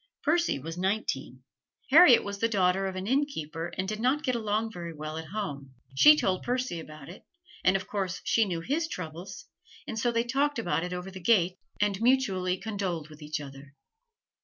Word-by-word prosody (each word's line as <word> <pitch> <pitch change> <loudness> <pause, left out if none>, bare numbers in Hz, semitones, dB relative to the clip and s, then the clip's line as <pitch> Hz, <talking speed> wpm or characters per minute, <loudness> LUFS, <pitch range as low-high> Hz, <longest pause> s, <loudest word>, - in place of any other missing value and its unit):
Percy 340 - +2
was 165 +5 -7
nineteen. 180 -10 -2 0.5
Harriet 300 -5 +8
was 200 0 -5
the 230 - +2
daughter 190 -2 +2
of 190 - -5
an 185 0 -4
innkeeper 185 - -1
and 185 +1 -1
did 215 +1 -3
not 260 +6 +1
get 255 - 0
along 220 -1 -1
very 170 -4 -7
well 155 +1 -6
at 160 0 -6
home. 140 -10 -5 0.2
She 300 - +8
told 185 -9 0
Percy 250 -8 -2
about 155 -3 -11
it, 175 - -11 0.4
and 185 - +4
of 190 -1 -1
course 195 -2 -3
she 225 - +3
knew 175 -4 -3
his 310 - -1
troubles, 180 - -7 0.4
and 220 - -4
so 240 +1 +1
they 230 0 +1
talked 275 +4 0
about 175 -6 0
it 180 - -4
over 180 +1 -5
the 190 -1 -9
gate, 185 -2 +3 0.2
and 205 -1 0
mutually 195 -8 +2
condoled 190 -6 -4
with 155 +1 -14
each 150 +1 -4
other. 140 0 -11
190 Hz, 190 wpm, -28 LUFS, 165-230 Hz, 0.5 s, Harriet